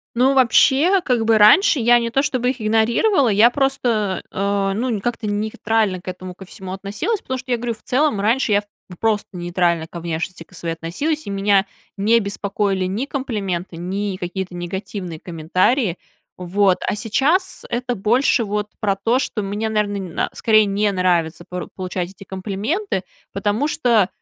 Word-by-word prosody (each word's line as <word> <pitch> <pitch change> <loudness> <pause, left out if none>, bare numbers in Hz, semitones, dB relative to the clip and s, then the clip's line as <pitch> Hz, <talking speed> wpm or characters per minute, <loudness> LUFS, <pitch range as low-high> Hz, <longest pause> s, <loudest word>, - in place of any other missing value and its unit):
Ну, 260 +3 +3
вообще, 275 - +4
как 245 -6 +1
бы 225 -1 +4
раньше 245 - +6
я 240 0 +5
не 235 0 -2
то 270 +4 +2
чтобы 250 -3 0
их 260 -1 -5
игнорировала, 230 - +3
я 215 +2 +6
просто, 240 -8 0
э, 200 0 0
ну, 245 +5 -1
не 220 -5 -1
как-то 230 0 -3
нейтрально 210 -1 0
к 180 - -12
этому 185 0 -7
ко 190 - -11
всему 190 0 -9
относилась, 205 - -3
потому 260 0 -4
что 255 0 -5
я 245 - +3
говорю, 235 0 -3
в - - -22
целом, 265 -5 +1
раньше 230 +4 +1
я 205 0 +3
п - - -24 0.3
просто 220 -2 0
нейтрально 175 -2 0
ко 170 - -8
внешности 170 +1 -4
ко 175 - -19
своей 165 -1 -3
относилась, 280 - -3
и 200 - -4
меня 195 0 +3 0.3
не 220 +4 +3
беспокоили 200 -2 -1
ни 215 +9 -2
комплименты, 195 - -3
ни 190 +3 -3
какие-то 180 0 -5
негативные 180 -1 -5
комментарии. 185 - 0 0.4
Вот, 185 +1 +2
а - - 0
сейчас 280 - 0
это 245 +1 -2
больше 240 +5 +2
вот 210 0 -2
про 200 -3 +1
то, 230 +6 +1
что 220 -5 -3
мне, 205 +3 -2
наверно, 210 -2 0 0.3
н - - -2
скорее 215 -1 +4
не 205 +1 +1
нравится 175 -3 0
пору 180 0 -5
получать 185 -1 -3
эти 195 +1 -13
комплименты, 200 - -3 0.3
потому 205 +8 0
что 235 - +2
205 Hz, 175 wpm, -20 LUFS, 185-240 Hz, 0.4 s, раньше